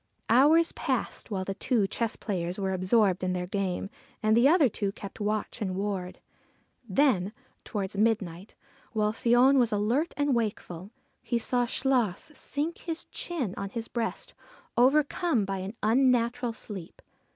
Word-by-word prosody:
Hours 300 +8 +5
passed - - -3
while 190 -3 -2
the 195 - -2
two 210 +2 +1
chess 225 +3 -2
players 180 -4 -3
were 190 -1 -1
absorbed 185 0 +2
in 185 0 0
their 180 0 -2
game 195 0 -2 0.3
and 215 0 +4
the 240 +3 +6
other 315 -2 +5
two 200 -3 -2
kept 200 0 -10
watch 215 +3 -2
and 190 -3 -2
ward. 190 -2 -3 0.7
Then, 205 -4 +2 0.3
towards 200 -2 -4
midnight, 200 -4 -1 0.4
while 210 -1 +1
Fion 245 +4 +4
was 240 -2 +2
alert 230 +10 0
and 290 -1 +2
wakeful, 205 -5 -3 0.3
he 240 - -1
saw 245 +1 0
Chluas 255 - 0
sink 305 +4 -3
his 330 -1 -5
chin 275 - -3
on 200 - -4
his 230 +2 -5
breast, 230 -2 -4 0.4
overcome 275 - +3
by 195 0 -3
an 190 +4 -6
unnatural 240 0 +2
sleep. 195 -6 -9
220 Hz, 150 wpm, -28 LUFS, 195-250 Hz, 0.7 s, the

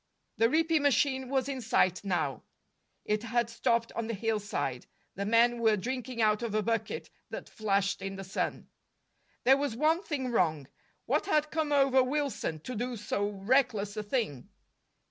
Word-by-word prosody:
The 230 +1 +4
reaping 320 +1 +2
machine 265 -2 +2
was 265 -1 0
in 270 -2 -3
sight 185 -5 +2
now; 175 - -1 0.6
it 210 0 0
had 235 0 0
stopped 230 0 +1
on 230 -1 -3
the 230 - -2
hillside. 200 - -2 0.3
The 200 +1 -3
men 235 +2 +4
were 220 -2 +4
drinking 250 +2 -3
out 215 0 +3
of 230 -3 -3
a 215 - +2
bucket 225 0 -2 0.2
that - - -7
flashed 200 -2 0
in 195 0 -4
the 195 - -6
sun. 190 - -3 0.8
There 265 +2 +6
was 280 -5 -2
one 315 +6 +2
thing 270 -9 -3
wrong. 160 - +1 0.4
What - - 0
had 305 -5 +2
come 315 -2 -1
over 270 -2 +5
Wilson, 260 - -2
to 250 - -6
do 245 +2 -3
so 205 0 -1
reckless 210 0 +1
a 215 - -2
thing? 205 - -2
230 Hz, 165 wpm, -30 LUFS, 205-265 Hz, 0.8 s, There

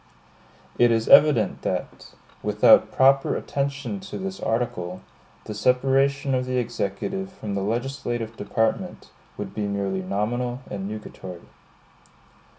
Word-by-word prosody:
It 120 - +6
is 115 -1 +1
evident 135 -9 +6
that, - - -4 0.3
without - - +5
proper 135 +1 +4
attention 140 +7 -3
to 190 0 -7
this 190 0 -5
article, 95 -6 -2 0.4
the 105 - -6
separation 135 +5 +2
of 125 0 0
the 130 0 -1
executive 120 - -3
from 110 - -6
the 100 - -1
legislative 120 +1 -3
department 110 +2 -2 0.3
would 100 -1 -6
be 105 -1 -2
merely 100 -1 -2
nominal 120 +7 -2
and 95 -1 -4
nugatory. 95 -4 -8
120 Hz, 120 wpm, -24 LUFS, 105-135 Hz, 0.4 s, It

